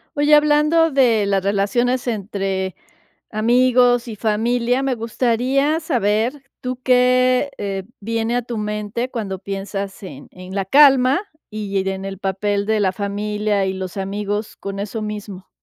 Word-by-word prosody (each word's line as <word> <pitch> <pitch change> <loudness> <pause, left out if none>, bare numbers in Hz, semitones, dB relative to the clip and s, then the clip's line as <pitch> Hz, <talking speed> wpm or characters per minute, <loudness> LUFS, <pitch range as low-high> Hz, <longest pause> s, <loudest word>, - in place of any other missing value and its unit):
Oye, 290 +1 +3
hablando 300 +2 +4
de 240 -6 +3
las 195 -1 +1
relaciones 240 +6 0
entre 195 -4 -2 0.6
amigos 245 +2 +3
y 225 - -6
familia, 235 +4 0
me 270 -2 0
gustaría 250 +6 0
saber, 245 - 0 0.2
¿tú 250 0 -4
qué, 255 +2 +3
eh, 195 -1 -3 0.2
viene 225 +2 -2
a 245 - +1
tu 235 -1 -6
mente 210 +3 -3
cuando 200 -6 -4
piensas 195 0 -5
en 145 -6 -10
en 185 +1 -10
la 195 -1 -1
calma, 270 - +5 0.3
y 205 -2 -2
en 190 0 -5
el 195 -1 -6
papel 200 +1 -1
de 220 0 +2
la 195 -2 +2
familia 205 0 -1
y 190 - -1
los 190 0 -6
amigos 205 +2 -3
con 195 0 -6
eso 210 +2 -4
mismo? 205 -3 -7
215 Hz, 145 wpm, -20 LUFS, 200-250 Hz, 0.6 s, calma